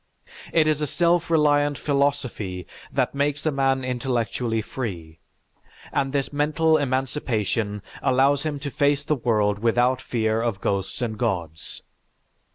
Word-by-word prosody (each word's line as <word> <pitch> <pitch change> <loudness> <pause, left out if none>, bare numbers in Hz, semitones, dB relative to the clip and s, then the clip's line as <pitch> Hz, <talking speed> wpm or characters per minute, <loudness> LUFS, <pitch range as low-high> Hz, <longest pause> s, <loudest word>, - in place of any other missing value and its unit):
It 160 -2 +4
is 155 -1 +1
a 150 - 0
self 170 +3 +2
reliant 145 -3 +3
philosophy 130 - -1 0.3
that - - 0
makes 145 +1 -1
a 155 - +2
man 135 -1 +1
intellectually 120 -2 -1
free, 85 -11 -6 0.7
and 135 -1 0
this 140 0 -1
mental 155 +2 +2
emancipation 120 -7 -1 0.2
allows 135 +2 +3
him 150 -1 -2
to 140 -1 -4
face 145 +1 +2
the 150 - 0
world 105 -6 +1
without 120 +3 +2
fear 110 -2 0
of 115 -4 -1
ghosts 100 +5 -2
and 110 -3 -3
gods. 85 -9 -3
130 Hz, 135 wpm, -24 LUFS, 110-145 Hz, 0.7 s, It